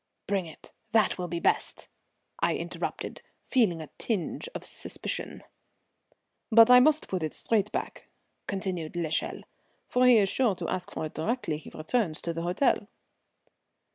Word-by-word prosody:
"Bring 195 -3 -1
it; 160 - -14 0.2
that 220 -4 +3
will 180 - -2
be 170 0 -3
best," - - 0 0.5
I - - +2
interrupted, - - -4 0.2
feeling 190 -11 +2
a 150 - -12
tinge 220 - -2
of - - -5
suspicion. - - -5 1.1
"But 230 +2 +8
I 250 - +10
must 305 +4 +4
put 185 -2 -2
it 155 -1 -3
straight 210 -2 0
back," - - -4 0.4
continued 185 -5 -3
l'Echelle, 165 -2 -2 0.4
"for 250 0 +3
he 245 -2 +8
is 200 -2 +4
sure 225 -1 +2
to - - -5
ask 185 -1 -3
for - - -3
it 155 - -7
directly 215 -4 -1
he 155 - -11
returns 160 0 -1
to 170 - -2
the 165 - -4
hotel." 190 +5 +1
190 Hz, 155 wpm, -28 LUFS, 165-230 Hz, 1.1 s, I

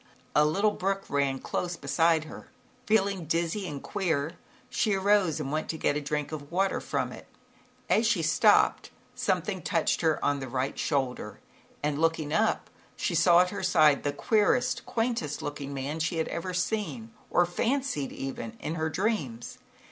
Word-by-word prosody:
A 150 - +6
little 200 +7 +2
brook 195 0 -1
ran 140 -1 +1
close 175 +5 -3
beside 160 +3 +2
her. 155 - -10 0.4
Feeling 200 -4 +2
dizzy 170 +5 -1
and 145 -4 -6
queer, 160 -7 -1 0.4
she 210 -2 +1
arose 195 -5 +2
and 140 -2 -3
went 155 +1 -2
to 160 - -2
get 145 - +1
a 150 - -1
drink 150 +1 -2
of 145 -1 -7
water 195 +3 +1
from - - -2
it. - - -11 0.6
As 225 +1 +3
she 205 -7 +2
stooped, 155 0 +4 0.2
something - - -1
touched - - 0
her 160 -2 +2
on 145 0 +1
the 130 +1 -2
shoulder 125 -7 -2 0.4
and 150 0 0
looking 160 -2 +1
up, 220 +3 +1 0.2
she - - -2
saw 170 +1 +6
at 180 0 0
her 200 - -4
side, 155 -6 +4
the 145 - -1
queerest, 220 - +1
quaintest 225 - -1
looking 145 -1 -5
little 135 -1 -3
man 155 +3 -3
she 165 +2 -1
had 160 - -1
ever 175 +2 -3
seen 220 +5 -2 0.2
or 175 - +4
fancied, 230 - -1
even 115 -4 -6
in 160 - -3
her 160 -1 -1
dreams. 160 - -2
165 Hz, 170 wpm, -28 LUFS, 145-195 Hz, 0.6 s, A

